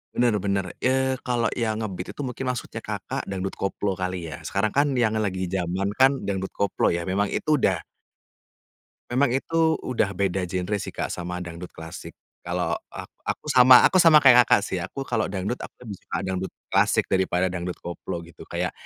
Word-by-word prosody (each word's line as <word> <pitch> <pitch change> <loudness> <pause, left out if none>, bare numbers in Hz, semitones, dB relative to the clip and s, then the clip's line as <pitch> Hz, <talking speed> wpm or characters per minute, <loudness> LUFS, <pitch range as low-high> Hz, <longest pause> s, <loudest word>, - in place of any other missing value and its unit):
Benar 120 -4 +2
benar, 100 0 0
eee, 130 0 +1
kalau 120 -2 0
yang 110 -2 -1
nge-beat 90 -4 -5
itu - - -5
mungkin 130 0 -4
maksudnya 125 -1 -3
Kakak - - -5
dangdut 95 0 -3
koplo 100 +1 -1
kali 90 -3 -4
ya? 75 - -7
Sekarang 100 +6 -1
kan 140 -1 +2
yang 115 -3 +2
lagi 95 -4 -2
jaman 95 +1 -1
kan 135 +1 +4
dangdut 95 -1 -3
koplo 100 -1 +1
ya, 85 0 -1
memang 95 +3 0
itu 150 +7 +1
udah 95 -7 +1 1.3
memang 130 +1 +3
itu 160 0 +1
udah 115 -5 -1
beda 95 -1 -1
genre 90 +3 -2
sih 100 - -4
Kak - - -3
sama 90 0 -4
dangdut 85 0 -8
klasik. 80 0 -9 0.3
Kalau - - -1 0.2
a - - -6 0.2
aku - - -3
sama 125 -1 +8
aku 185 - +2
sama 160 -2 +8
kayak 125 -2 +8
Kakak 100 - +4
sih, 95 - -2
aku 135 +9 -5
kalau 110 -5 -1
dangdut 100 +5 -3
aku - - -9
lebih 105 -4 -6
suka - - -5
dangdut 95 0 -3 0.2
klasik - - +3
daripada 95 -1 +1
dangdut 90 0 -4
koplo 85 0 -5
gitu, 85 - -13
kayak - - -2
100 Hz, 185 wpm, -25 LUFS, 90-125 Hz, 1.3 s, sama